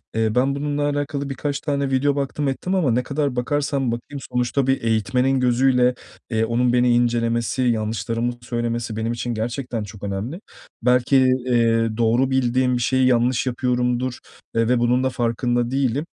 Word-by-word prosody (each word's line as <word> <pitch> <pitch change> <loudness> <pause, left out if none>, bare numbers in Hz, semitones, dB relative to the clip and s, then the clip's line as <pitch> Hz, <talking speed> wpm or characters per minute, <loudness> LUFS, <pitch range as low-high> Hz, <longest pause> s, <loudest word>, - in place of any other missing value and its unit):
Eee, 110 0 0
ben 135 +2 +2
bununla 145 0 -2
alakalı 145 -1 -2
birkaç 140 +1 -3
tane 140 -2 -2
video 140 +2 +2
baktım 140 +1 -2
ettim 180 +8 -2
ama 165 -9 +2
ne 125 +2 +1
kadar 140 -1 -2
bakarsam 135 0 -1
bakayım 120 +4 -6
sonuçta 125 +2 0
bir 135 0 +1
eğitmenin 125 +4 +1
gözüyle, 125 0 +3 0.3
eee, 110 -1 +1
onun 120 +2 +1
beni 125 0 +3
incelemesi, 120 +1 0
yanlışlarımı 115 +1 -1
söylemesi 120 -1 -3
benim 110 +1 -2
için 120 0 -3
gerçekten 120 0 -3
çok 105 0 -11
önemli. 100 - -4 0.4
Belki, 125 +3 +3 0.3
eee, 115 -2 +2
doğru 120 +3 +2
bildiğim 125 -1 +1
bir - - -3
şeyi 130 +2 +2
yanlış 125 0 +2
yapıyorumdur, 125 0 0 0.4
eee, 115 0 +2
ve 125 0 +2
bunun 120 +2 +2
da 130 - +2
farkında 120 0 -1
değilim 135 +2 0
125 Hz, 160 wpm, -22 LUFS, 115-135 Hz, 0.4 s, gözüyle